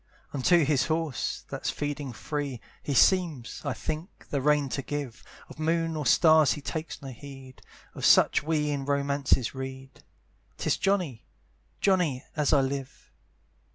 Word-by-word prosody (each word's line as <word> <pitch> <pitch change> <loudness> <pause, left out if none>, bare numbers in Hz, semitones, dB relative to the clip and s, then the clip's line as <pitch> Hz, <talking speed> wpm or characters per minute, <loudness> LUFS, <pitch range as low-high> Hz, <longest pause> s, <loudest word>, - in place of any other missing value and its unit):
Unto 155 +4 +4
his 140 -3 +2
horse, 160 -5 -2
that's - - -3
feeding 145 -2 -3
free, 140 +2 -4 0.2
He 140 - -3
seems, 165 -8 +2
I - - -1
think, 155 +5 -6
the 140 - 0
rein 150 0 +3
to 140 - -2
give; 135 -5 -5 0.2
Of - - -13
moon 165 +1 0
or 150 -4 -2
stars 155 0 +6
he - - -6
takes 160 +3 -5
no 135 - -6
heed; 130 +1 -11 0.3
Of - - -8
such - - +5
we 150 -1 0
in 140 -1 -2
romances 140 -3 +1
read, 130 0 -8 0.5
'Tis - - 0
Johnny! 180 - -1 0.5
Johnny! 175 -10 +2
as 150 -2 +1
I 140 - +5
live. 135 0 -5
145 Hz, 150 wpm, -28 LUFS, 135-155 Hz, 0.5 s, stars